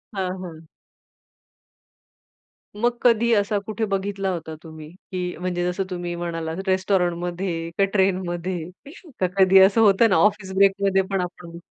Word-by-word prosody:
हां, 185 -1 -2
हां. 160 -2 -10 2.1
मग 240 +3 0
कधी 235 -1 +3
असा 205 0 +1
कुठे 220 +1 -2
बघितला 195 0 -2
होता 160 -2 -6
तुम्ही, 155 -1 -11
की 180 0 -6
म्हणजे, 180 -1 -2
जसं 195 +2 -2
तुम्ही 175 -1 -4
म्हणालात, 165 -1 -4
रेस्टोरंटमध्ये, 180 -2 -1
का 195 - +3
ट्रेनमध्ये? 180 -3 -1 0.5
का 185 - +2
कधी 190 0 +6
असं 195 +4 +5
होतं 215 +2 +5
ना, 185 - +3
ऑफिस 190 +1 +1
ब्रेकमध्ये 195 0 +3
पण 195 -2 0
आपण 175 -1 -8
185 Hz, 135 wpm, -23 LUFS, 175-195 Hz, 2.1 s, कधी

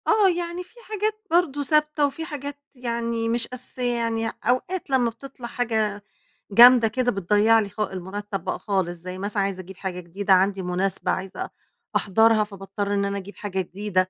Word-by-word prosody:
آه، 425 -3 +5
يعني، 345 +1 -3
في 365 - -24
حاجات 430 0 -2
برضه 320 -5 +2
ثابتة، 300 0 +3
وفي 320 +4 -5
حاجات 285 -3 -6 0.2
يعني 235 -2 -2
مش 235 0 +3
أساسية، 250 -1 -3
يعني 225 -1 0
أوقات، 270 +10 0
لمّا 255 -3 +3
بتطلع 245 +1 -9
حاجة 220 -4 -1 0.5
جامدة 240 +2 +8
كده، 245 +2 0
بتضَيع 210 +3 +4
لي 205 -2 -2
خا 205 0 -3
المرتب 195 +2 -5
بقى - - -3
خالص 190 -4 0
زي 180 +2 -7
مثلًا 200 +1 -1
عايزة 195 -1 -2
أجيب 185 +1 -12
حاجة 185 -2 -4
جديدة 190 +3 0
عندي 190 +1 +3
مُناسبة 185 +1 -1
عايزة 190 0 -3
أ - - -11 0.5
أحضرها 220 +2 +4
فباضطر 200 0 -4
إن 200 0 +1
أنا 200 0 -2
أجيب 200 +1 -8
حاجة 190 -2 -3
جديدة، 185 0 -1
220 Hz, 175 wpm, -24 LUFS, 195-255 Hz, 0.5 s, جامدة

